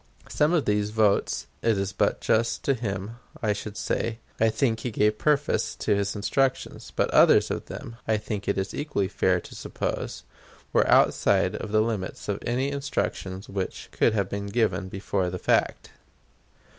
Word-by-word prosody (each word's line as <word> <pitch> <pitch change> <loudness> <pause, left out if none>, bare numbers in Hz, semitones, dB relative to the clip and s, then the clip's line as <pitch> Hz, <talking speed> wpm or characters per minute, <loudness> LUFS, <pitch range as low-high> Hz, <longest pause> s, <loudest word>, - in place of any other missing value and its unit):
Some 150 +2 +2
of 170 -5 +2
these 105 0 +1
votes, 105 -2 +1 0.2
it 115 -3 +2
is 100 0 -2
but - - +1
just 115 +1 +1
to 140 - +2
him 110 -2 -4 0.3
I 105 -2 +2
should 105 0 -7
say, 115 +2 -1 0.2
I 110 - +4
think 115 -1 +1
he 125 - -3
gave 105 -1 +1
perforce 150 -1 +1
of - - +2
his 100 +1 -1
instructions; 130 +6 -1
but - - +1
others - - +5
of - - -4
them, 115 - -8
I 110 -1 +2
think 105 -1 -5
it 100 - +1
is 95 0 -2
equally 140 -10 -1
fair 95 -2 +1
to - - -12
suppose, - - -4 0.5
were - - +3
outside - - +4
of 105 - -5
the 110 0 +4
limits 110 -4 -3
of 100 -1 -1
any 130 +3 0
instructions 105 -9 -3
which 95 -1 -4
could 110 - +2
have 100 -3 +1
been 100 +1 -4
given 100 -4 0
before 95 -1 -1
the 90 - -4
fact. - - 0
105 Hz, 175 wpm, -26 LUFS, 100-115 Hz, 0.5 s, others